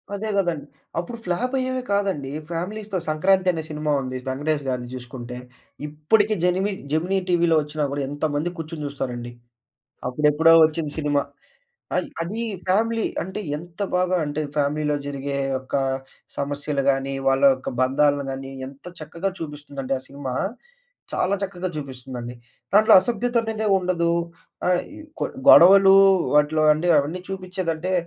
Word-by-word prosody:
అదే 215 +2 -4
గదండీ. 170 -7 0 0.3
అప్పుడు 230 +7 -5
ఫ్లాపయ్యేవె 255 +7 -1
కాదండి. 190 -9 0 0.2
ఫ్యామిలీస్‌తో 195 +4 -4
'సంక్రాంతి' 185 +4 +3
అనే 160 -1 -4
సినిమా 150 0 -2
ఉంది 130 0 -4
వెంకటేష్ 145 +2 -1
గారిది 125 -1 -3
చూసుకుంటే. 125 -1 -8 0.5
ఇప్పటికి 205 +9 +2
జెనిమి 190 +3 +2 0.2
జెమినీ 180 +5 +1
టీవీలోచ్చినా 155 -3 +2
గూడా 140 -1 -2
ఎంతమంది 145 +3 -2
కూర్చొని 160 -1 -6
చూస్తారండి. 120 -4 -5 0.8
అప్పుడెప్పుడో 150 +5 +4
ఒచ్చింది 155 -1 -3
సినిమా. 145 -1 +1 0.8
అయి - - 0 0.2
అది 200 +7 -4 0.3
ఫ్యామిలీ 225 +3 +2 0.2
అంటే, 190 +4 -5 0.2
ఎంత 170 +4 -12 0.2
బాగా 185 0 +2
అంటే 145 +1 -3 0.2
ఫ్యామిలీలో 150 +1 +1
జరిగే 140 0 -4 0.2
ఒక్కా 135 +1 -1 0.6
సమస్యలు 145 0 -2
గాని, 135 0 -1 0.2
వాళ్ళ 135 +1 +2
యొక్క 130 - -6
బంధాలు 145 +2 +2
గాని 135 0 -6 0.2
ఎంత 140 0 -16 0.2
చక్కగా 170 +5 -3
చూపిస్తుందంటే 145 -3 -6
ఆ - - -13
సినిమా, 140 -2 -6 0.8
చాలా 195 +2 +1
చక్కగా 185 -1 -3
జూపిస్తుందండి. 125 -3 -7 0.4
దాంట్లో 215 +1 +7
అసభ్యత 240 +4 -2
అనేదే 220 -1 -3
ఉండదు. 175 -2 0 0.6
ఆ - - +3 0.3
ఇ - - -10 0.2
కొ - - +1 0.2
గొడవలు 195 +2 +9 0.4
వాటిలో 150 +1 +3
అంటే 170 +3 -2
అవన్నీ 155 +6 -2
చూపించేదంటే 185 -2 -3
155 Hz, 130 wpm, -23 LUFS, 140-185 Hz, 0.8 s, గొడవలు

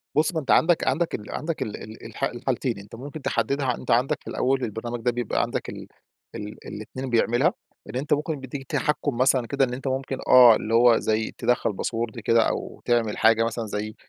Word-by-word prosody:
بُص، 155 +4 +2
ما 160 - 0
أنت 140 - -2
عندك 165 0 +4
عندك 165 +5 +1
ال 105 - -8
عندك 165 0 -4
ال 105 - -3
ال 110 +1 -11
الح 115 +4 -8
الحالتين. 125 -2 -1
أنت 100 +3 -11
ممكن 145 +6 -8
تحدّدها 130 +1 0
أنت - - -5
عندك 125 +3 +2
في - - -16
الأول 130 0 0
البرنامج 115 +2 -4
ده 120 - +1
بيبقى 120 -2 -1
عندك - - -3
ال - - -8 0.5
ال 105 0 -6
الاتنين 130 +5 -6
بيعملها. 120 +7 +2 0.4
إن - - -7
أنت 140 +4 0
ممكن 150 0 -1
بيدّيك 135 +1 -7
تحكُّم 145 -3 -1
مثلًا 130 -1 +3
كده 135 +1 +2
إن 125 - -6
أنت 135 +2 -5
ممكن 130 0 -2
آه، 125 -3 +9
اللي 110 +1 -3
هو 120 0 +6
زي 110 0 -1
تِدخّل 120 -2 +1
باسورد 115 +3 -3
كده 115 +1 +3
أو - - -5
تعمل 115 -3 +1
حاجة 115 0 +4
مثلًا 115 0 -2
زي 105 +1 -4
120 Hz, 205 wpm, -25 LUFS, 115-135 Hz, 0.5 s, آه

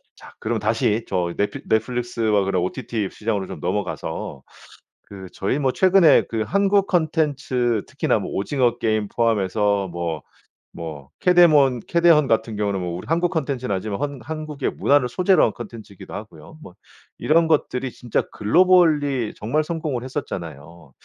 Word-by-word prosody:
자 - - -15
그럼 115 +1 -2
다시 110 +1 0
저 90 -2 -1
넷플 105 - -2
넷플릭스와 115 -2 0
그런 95 -2 0
OTT 110 0 -3
시장으로 105 -3 -2
좀 - - -8
넘어가서 - - -4 0.7
그 95 -2 -10
저희 100 +8 -1
뭐 135 -3 +1
최근에 185 -1 +5
그 110 -1 -2
한국 200 0 +2
콘텐츠 145 - 0
특히나 - - 0
뭐 - - -5
오징어 120 +3 0
게임 110 -2 0
포함해서 105 -3 0
뭐 85 -3 -4 0.6
뭐 80 -5 -7
캐데몬 155 -8 +5
캐데헌 170 -4 +4
같은 110 -2 0
경우는 100 -2 -1
뭐 85 -1 -4
우리 90 - -9
한국 170 +2 +1
콘텐츠는 135 - -2
아니지만 100 +1 -3
헌 145 +1 -4
한국의 155 +2 -4
문화를 140 -3 +2
소재로 180 +9 +2
한 - - -1
콘텐츠이기도 115 -5 -10
하고요. 110 +9 -10
뭐 90 - -12 0.4
이런 165 +2 +3
것들이 135 -5 0
진짜 120 -1 -2
글로벌리 150 - +3
정말 145 +9 -1
성공을 155 -6 -3
했었잖아요. 85 - -7
120 Hz, 345 characters per minute, -22 LUFS, 100-150 Hz, 0.7 s, 최근에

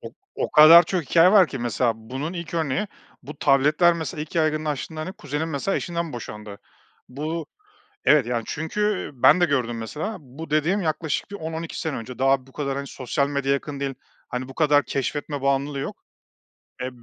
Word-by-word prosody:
O - - -8 0.2
o - - -2
kadar 160 +3 +9
çok 175 0 -2
hikâye 170 +7 +5
var 195 -5 +7
ki. 135 - -6
Mesela 120 0 0
bunun 130 +9 -5
ilk 170 -2 -6
örneği 160 +3 0 0.4
bu 150 0 -10
tabletler. 150 +5 +4
Mesela 160 -2 -5
ilk 155 - -7
yaygınlaştığında, 155 -1 -1
hani, 180 +4 -5
kuzenim 150 -2 -4
mesela 155 +6 -1
eşinden 170 -2 -3
boşandı. 105 -3 -8 0.5
Bu, 155 +4 -4 0.6
evet. 150 -5 +5
Yani, 120 -1 -1
çünkü, 160 +7 -4 0.3
eee, 125 - -21
ben 180 - +7
de - - +5
gördüm 125 -7 0
mesela. 155 - -4
Bu 145 +4 -10
dediğim 155 +7 +2
yaklaşık 160 0 -2
bir 200 - -5
10-12 160 -1 -5
sene 160 -3 -3
önce. 120 +1 -8
Daha 135 0 +2
bu 135 - -19
kadar, 140 -2 -3
hani, 140 0 -4
sosyal 140 +2 -2
medya 140 -1 0
yakın 140 0 -3
değil, 135 -1 -2 0.3
hani, 125 +1 -4
bu 135 - -10
kadar 150 -2 +3
keşfetme 145 +1 -3
bağımlılığı 140 +1 0
yok. 135 - -6 0.8
Eee, 130 - -2
145 Hz, 185 wpm, -24 LUFS, 135-160 Hz, 0.8 s, kadar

